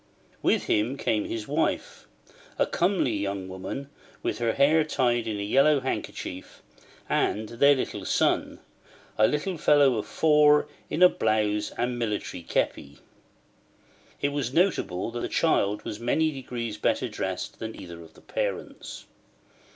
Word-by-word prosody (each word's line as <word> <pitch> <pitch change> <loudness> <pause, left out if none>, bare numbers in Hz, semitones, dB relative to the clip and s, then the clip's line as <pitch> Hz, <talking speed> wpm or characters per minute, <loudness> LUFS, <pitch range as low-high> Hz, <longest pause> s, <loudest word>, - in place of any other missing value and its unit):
With - - +2
him 115 +6 0
came 110 -5 0
his 110 -2 -5
wife, - - -2 0.5
a - - +3
comely 175 - +1
young 100 -2 -3
woman 95 +9 -6 0.4
with 105 - -2
her 115 -1 +1
hair 150 +3 +4
tied 120 -6 0
in 105 -2 -2
a - - -2
yellow 135 +7 +4
kerchief, 95 -7 -5 0.4
and 110 +1 0
their 140 +3 +4 0.2
son, - - +1 0.6
a 110 - +6
little 160 +4 -2
fellow 145 -5 +4
of 105 - -6
four, 150 0 +4 0.2
in 175 - +2
a - - +11
blouse 105 -6 0
and 120 0 -1
military 105 -5 -3
képi. 70 -3 -2 1.2
It 145 - +1
was 140 -4 -2
notable 150 - +1
that 120 - -4
the - - -3
child 105 -10 +1
was 105 - -5
many 155 +7 +1
degrees 120 -5 -5
better - - +1
dressed - - -4
than 110 0 -6
either 85 -1 -9
of 80 -1 -15
the - - -17
parents. - - -5
120 Hz, 145 wpm, -26 LUFS, 105-145 Hz, 1.2 s, a